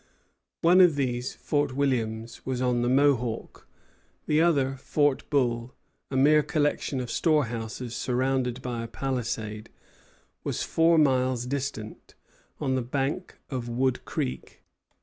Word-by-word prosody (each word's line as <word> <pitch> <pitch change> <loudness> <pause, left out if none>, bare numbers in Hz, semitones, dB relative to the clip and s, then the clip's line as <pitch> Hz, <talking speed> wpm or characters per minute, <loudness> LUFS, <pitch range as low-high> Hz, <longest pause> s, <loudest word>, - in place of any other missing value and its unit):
One 180 +3 +7
of 175 -5 +6
these, 125 -2 -2
Fort 145 -3 -1
Williams, 115 -5 -1
was 130 -1 -2
on 125 -1 +1
the 120 - +1
Mohawk; 130 -4 +1 0.6
the 150 +1 +3
other, 140 -6 +2
Fort 145 +1 0
Bull, 120 -4 0 0.3
a 130 - -2
mere 150 +3 +6
collection 145 -3 0
of 125 -2 -4
storehouses 120 -6 -1
surrounded 130 -1 -1
by 120 -2 -3
a - - -5
palisade, 115 -4 -3 0.7
was - - -2
four 165 +1 +3
miles 130 -4 +2
distant, 130 -5 -5 0.4
on 130 - 0
the 130 - +1
bank 135 +8 -3
of 125 -3 -3
Wood 130 +2 0
Creek. 65 +1 -5
130 Hz, 130 wpm, -27 LUFS, 120-145 Hz, 0.7 s, One